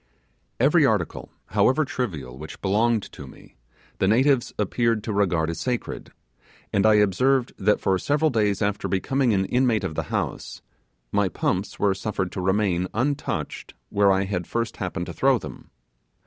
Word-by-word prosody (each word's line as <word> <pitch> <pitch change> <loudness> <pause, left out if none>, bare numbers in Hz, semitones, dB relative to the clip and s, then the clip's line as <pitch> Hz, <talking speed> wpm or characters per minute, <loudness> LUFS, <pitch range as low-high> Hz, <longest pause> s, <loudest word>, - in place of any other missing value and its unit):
Every 150 +6 +4
article, 110 - 0 0.2
however 140 +4 +3
trivial, 80 - -4
which 75 +3 -9
belonged 110 +2 +1
to - - -10
me, - - -16 0.4
the 95 - +2
natives 130 +4 +3
appeared 115 +1 0
to 110 - -3
regard 85 -5 +1
as 80 - -6
sacred; 125 -2 -4 0.6
and 100 +2 +3
I 110 - +6
observed 125 +6 +2
that 105 +2 +2
for 95 -1 +1
several 150 - +1
days 105 -3 +1
after 100 0 -1
becoming 125 +6 +1
an 95 -2 +1
inmate 125 -1 +1
of - - -3
the - - -1
house, - - -4 0.5
my 100 -2 +2
pumps 95 +2 -2
were 100 -2 +2
suffered 95 -2 -3
to 95 - -4
remain, 95 -1 +1
untouched, 140 +6 -2
where 100 -1 +3
I 95 0 +2
had 90 -3 -3
first 115 -1 -2
happened - - -3
to - - -7
throw - - +3
them. - - -10
105 Hz, 160 wpm, -24 LUFS, 95-120 Hz, 0.6 s, I